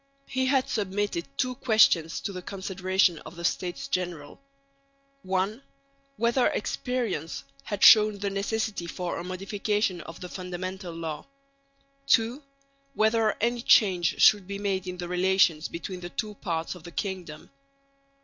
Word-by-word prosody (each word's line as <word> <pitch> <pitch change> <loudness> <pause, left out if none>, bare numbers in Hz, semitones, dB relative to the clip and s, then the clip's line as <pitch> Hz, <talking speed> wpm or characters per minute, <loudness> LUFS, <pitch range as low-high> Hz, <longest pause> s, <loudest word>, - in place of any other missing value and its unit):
He 260 0 -1
had 265 -1 +2
submitted 200 -5 -2
two 255 0 0
questions 215 -10 +3
to - - -3
the 185 - -6
consideration 190 -2 0
of 155 - -11
the 170 0 -5
States 175 0 -2
General: 175 - -4 0.8
(1) 190 +5 -1 0.6
whether 235 +2 +2
experience 220 - -2 0.2
had 205 -2 -3
shown 215 -1 +8
the 200 0 -2
necessity 205 -2 -2
for 175 0 -4
a - - -5
modification 195 0 -1
of 165 +2 -10
the 180 - -7
Fundamental 185 0 -6
Law; 160 -2 -5 0.8
(2) 240 +2 +3 0.5
whether 220 0 +2
any 235 +2 0
change 185 -8 +4
should 205 -3 +6
be 200 0 -4
made 195 -2 -2
in 180 0 -5
the 175 0 -5
relations 180 -3 +2
between 180 +2 -6
the 175 0 -7
two 210 +3 -4
parts 165 -5 -3
of 180 -3 -13
the 175 - -9
kingdom. 175 -4 -5
190 Hz, 140 wpm, -27 LUFS, 175-215 Hz, 0.8 s, shown